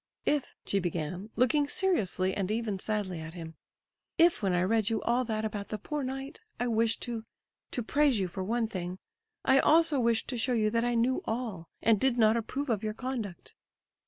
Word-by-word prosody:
"If"—she 275 -8 -1
began, 175 +3 -3
looking 285 +4 +3
seriously 200 - +1
and 195 -2 -2
even 215 -3 -1
sadly 200 -4 -2
at 160 +2 -8
him—"if 175 - -2
when 195 -3 +1
I 180 0 +2
read 220 +2 +2
you 225 -1 0
all 240 +2 +2
that 220 -1 -2
about 205 -2 -4
the 215 - -4
'poor 295 +8 -4
knight,' 270 +3 -5 0.2
I 245 - +1
wished 225 0 +1
to 235 -3 -4 0.5
to 245 - -3
praise 280 -1 +3
you 190 - 0
for 185 +2 -5
one 230 +4 0
thing—I 265 - -2
also 315 -2 +4
wished 230 -2 +1
to 250 -3 -2
show 250 +2 +1
you 215 -2 +2
that 230 +1 +1
I 240 0 +1
knew 245 +3 +2
all—and 220 -2 -1
did 265 0 +2
not 220 -1 +5
approve 255 +4 -2
of 210 -3 0
your 215 -1 -3
conduct." 235 -9 -5
225 Hz, 185 wpm, -30 LUFS, 195-255 Hz, 0.5 s, not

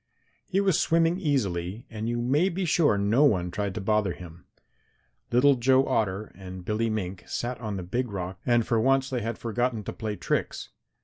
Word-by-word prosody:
He 190 - +1
was 195 -5 +2
swimming 165 +2 +2
easily 105 - -1
and 110 0 -4
you 120 0 -1
may 145 +10 +2
be 185 +1 -2
sure 155 -9 +3
no 105 +8 +3
one 90 -11 +2
tried 100 -1 -3
to - - -3
bother 105 -2 +1
him. 85 +2 -12 0.9
Little 130 +4 +5
Joe 130 +1 +3
Otter 105 -1 -1
and 95 -1 -9
Billy 110 +2 0
Mink 95 -4 -3
sat 120 0 -3
on 105 -3 -3
the 90 - -4
Big 120 +8 -2
Rock 95 -1 -5
and 120 -2 +2
for 115 -2 +1
once 135 +2 +2
they 125 -2 -1
had 115 +1 -3
forgotten 115 -1 -1
to - - -5
play 110 -2 -4
tricks. - - -2
115 Hz, 190 wpm, -27 LUFS, 100-130 Hz, 0.9 s, Little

